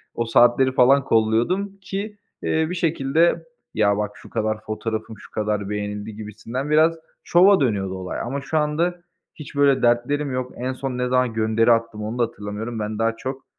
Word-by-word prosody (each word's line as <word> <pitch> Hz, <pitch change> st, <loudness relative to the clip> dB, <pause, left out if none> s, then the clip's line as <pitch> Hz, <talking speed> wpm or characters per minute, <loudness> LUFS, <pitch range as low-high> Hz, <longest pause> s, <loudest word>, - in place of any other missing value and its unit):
o 115 Hz, -, -1 dB
saatleri 120 Hz, +3 st, +4 dB
falan 130 Hz, +2 st, +5 dB
kolluyordum 120 Hz, -, +1 dB
ki, 200 Hz, +3 st, -5 dB, 0.3 s
eee, 160 Hz, 0 st, +1 dB
bir 180 Hz, -, -3 dB
şekilde, 165 Hz, 0 st, +1 dB, 0.3 s
ya 100 Hz, -1 st, +2 dB
bak 105 Hz, -1 st, -2 dB
şu -, -, -14 dB
kadar 110 Hz, -1 st, -2 dB
fotoğrafım 110 Hz, 0 st, -4 dB
şu -, -, -15 dB
kadar 105 Hz, -2 st, -2 dB
beğenildi 105 Hz, +1 st, -4 dB
gibisinden 110 Hz, +6 st, -6 dB
biraz 155 Hz, +2 st, +4 dB, 0.3 s
şova 190 Hz, +3 st, +5 dB
dönüyordu 100 Hz, -8 st, 0 dB
olay. 95 Hz, -1 st, -5 dB
Ama 135 Hz, +4 st, -3 dB
şu 155 Hz, +3 st, -2 dB
anda 165 Hz, +4 st, 0 dB, 0.3 s
hiç 150 Hz, -1 st, -10 dB
böyle 140 Hz, -2 st, +3 dB
dertlerim 125 Hz, +4 st, +1 dB
yok. 125 Hz, 0 st, -3 dB
En 130 Hz, +2 st, -2 dB
son 130 Hz, -1 st, -4 dB
ne 125 Hz, 0 st, 0 dB
zaman 125 Hz, -2 st, +1 dB
gönderi 110 Hz, +1 st, +2 dB
attım 115 Hz, -2 st, 0 dB
onu 110 Hz, +3 st, -4 dB
da -, -, +4 dB
hatırlamıyorum, 110 Hz, +1 st, -5 dB
ben 105 Hz, +1 st, -4 dB
daha 115 Hz, 0 st, +1 dB
çok, 130 Hz, +2 st, -6 dB
120 Hz, 175 wpm, -22 LUFS, 110-145 Hz, 0.3 s, falan